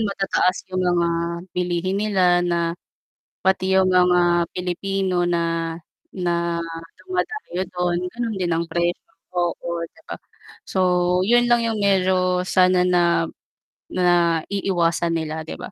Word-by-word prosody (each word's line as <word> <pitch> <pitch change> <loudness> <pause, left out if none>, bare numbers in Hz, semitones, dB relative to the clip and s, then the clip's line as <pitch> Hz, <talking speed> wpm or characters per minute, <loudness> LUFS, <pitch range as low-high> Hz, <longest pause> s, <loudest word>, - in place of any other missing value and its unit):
matataas 195 -3 0
yung 185 - 0
mga 175 -1 +2 0.4
bilihin 180 +1 -1
nila 185 -4 +3
na 170 -1 0 0.7
pati 190 0 +1
yung 190 0 +4
mga 180 -1 +3
Pilipino 185 0 -1
na 165 -1 -1 0.4
na 170 -2 -1 0.4
dumadayo 370 - -3
dun 180 -1 0 0.2
ganon 235 -3 -3
din 175 -2 0
ang 165 0 -1
presyo 175 0 -2 0.3
oo 170 -1 -2
'di 325 - -23
ba? - - -7 0.5
So 190 - -1 0.5
'yun 240 +2 +3
lang 235 -1 +3
yung 220 -2 -1
medyo 185 -2 +2
sana 185 -1 +3
na 170 -2 +3 0.7
naiiwasan 170 -1 +1
nila 160 0 -3
'di - - -5
ba? - - -8
180 Hz, 120 wpm, -22 LUFS, 170-190 Hz, 0.7 s, yung